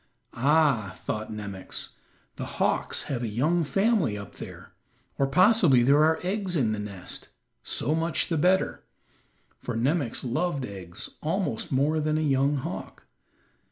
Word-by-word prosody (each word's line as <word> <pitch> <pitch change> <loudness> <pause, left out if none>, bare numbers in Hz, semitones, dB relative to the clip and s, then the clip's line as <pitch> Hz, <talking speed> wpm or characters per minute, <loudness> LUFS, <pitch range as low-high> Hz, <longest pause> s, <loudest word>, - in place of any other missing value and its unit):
"Ah," 135 -8 +2
thought 110 0 -4
Nemox, 100 -3 -5 0.5
"the - - -5
hawks - - +1
have 130 -4 -3
a 120 - -1
young 150 +11 +1
family 195 - +1
up 100 - -10
there, - - -10 0.5
or 135 - +3
possibly 180 - +5
there 140 +4 +5
are 160 +1 +3
eggs 190 -1 -1
in 120 -8 +2
the 105 - -2
nest; 100 -3 -2 0.3
so 145 - -1
much 165 0 0
the 165 - -1
better," 185 +4 +2 0.8
for 125 - -4
Nemox 135 +1 0
loved 140 +2 -1
eggs 95 -5 -7
almost 160 - -2
more 145 +4 +2
than 155 0 0
a - - 0
young 140 -1 +2
hawk. 130 - -6
140 Hz, 145 wpm, -27 LUFS, 115-165 Hz, 0.8 s, possibly